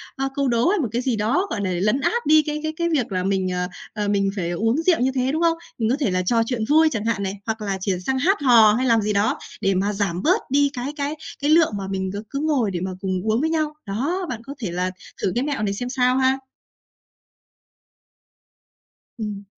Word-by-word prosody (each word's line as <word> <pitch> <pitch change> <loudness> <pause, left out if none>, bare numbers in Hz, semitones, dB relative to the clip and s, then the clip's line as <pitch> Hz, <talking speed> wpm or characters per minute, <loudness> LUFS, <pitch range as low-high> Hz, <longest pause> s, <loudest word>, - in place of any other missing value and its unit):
ơ, 270 -1 -1
câu 280 -1 +1
đố 235 +2 +2
hay 405 +1 +2
một 265 - 0
cái 235 +2 -1
gì 255 -2 0
đó, 245 - +1
gọi 205 - -3
là, 190 - -1
lấn 210 +9 +1
át 475 +10 0
đi 310 +1 +6
cái 300 0 -2
cái 315 0 -2
cái 340 0 0
việc 270 -10 0
là 185 -1 -1
mình, 190 -1 0
ờ, 180 0 -1 0.3
ờ, 210 -1 -2
mình 200 -1 +1
phải 175 -3 -2
uống 225 - +1
rượu 330 -1 +2
như 260 +2 +2
thế, 255 0 +1
đúng 315 +3 -1
không? 335 -1 +3 0.2
Mình 225 -2 0
có 250 - +3
thể 220 -10 +1
là 185 - +1
trò 230 +6 +2
chuyện 235 -1 -2
vui 315 +2 +5
chẳng 220 -5 -3
hạn 210 -3 0
này, 190 - -2
hoặc 220 -1 -3
là 195 -2 -2
chuyển 185 -1 -1
sang 265 0 0
hát 385 +9 +3
hò 230 -6 +6
hay 255 +3 0
làm 230 -2 +4
gì 210 0 -1
đó 205 +2 +1 0.2
để 195 0 +2
mà 200 +3 0
giảm 195 -3 -1
bớt 370 +7 +3
đi 285 +1 +4
cái 255 +3 -4
cái 285 +2 -2 0.3
cái 290 - +1
lượng 325 -3 +5
mà 195 -1 -5
mình 190 -1 -2
cứ 205 +2 -5
cứ 275 - -3
ngồi 285 -9 +1
để 175 - -3
mà 185 +2 -3
cùng 190 -1 -2 0.2
uống 225 +4 +1
với 320 - +1
nhau. 310 -2 0
Đó, 285 - -2
bạn 230 -3 -4
có 275 - -7
thể 210 -8 -3
là 180 +1 -1 0.3
thử 190 - +1
cái 245 - +1
mẹo 280 -6 -2
này 200 -1 0
xem 245 +4 -4
sao 250 0 +2
ha. 265 0 +2 2.8
Ừm. 210 -3 -5
235 Hz, 250 wpm, -22 LUFS, 200-285 Hz, 2.8 s, đi